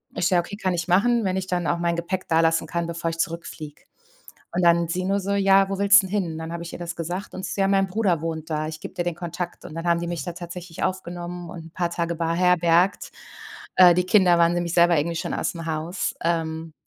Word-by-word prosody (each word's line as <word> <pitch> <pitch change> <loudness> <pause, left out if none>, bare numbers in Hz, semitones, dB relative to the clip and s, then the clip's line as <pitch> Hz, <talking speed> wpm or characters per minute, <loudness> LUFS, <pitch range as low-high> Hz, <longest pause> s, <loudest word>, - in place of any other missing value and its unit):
Ich: 180 0 +1
„Ja, 180 - +4
okay, 175 +4 -4
kann 190 -3 -1
ich 170 -1 -2
machen, 220 +5 +3
wenn 185 0 0
ich 190 - -3
dann 175 -3 -1
auch 145 - +1
mein 170 0 0
Gepäck 175 +2 -3
dalassen 165 0 +2
kann, 170 -1 -3
bevor 165 0 -3
ich 165 - -7
zurückfliege.“ 160 -3 -5 0.7
Und 180 - +1
dann 170 -1 +4
sie 180 +2 -2
nur 195 +1 +1
so: 200 +1 -3
„Ja, 195 -1 +4
wo 195 -1 -3
willst 200 0 +6
du - - -5
denn - - -12
hin?“ 160 -2 -5
Dann 160 +1 -6
habe 170 0 -5
ich 170 - -8
ihr - - -8
das 170 0 -5
gesagt 175 +4 -5
und 190 - -6
sie - - -5
so: 200 - -1
„Ja, 195 - +3
mein 195 0 +2
Bruder 185 -5 0
wohnt 160 -1 -4
da, 155 0 -1
ich 155 0 -7
gebe - - -8
dir 175 - -2
den 175 -1 -2
Kontakt.“ 175 0 -6
Und - - -9
dann 165 +1 -5
haben 170 0 +3
die 170 - -4
mich 170 -2 -3
da 175 - -5
tatsächlich 175 0 -7
aufgenommen 175 -1 -4
und 165 -2 -9
'n 165 - -13
paar 175 0 -1
Tage 170 0 -2
beherbergt. 175 +2 +2 0.6
Äh, 180 -2 +8
die 180 0 +1
Kinder 185 -3 +5
waren 170 0 +4
nämlich 175 -1 -2
selber 170 -1 +5
irgendwie 165 +3 -1
schon - - -3
ausm 165 -1 -3
Haus. 165 +3 -3
Ähm, 160 -1 -2
175 Hz, 255 wpm, -24 LUFS, 165-185 Hz, 0.7 s, Äh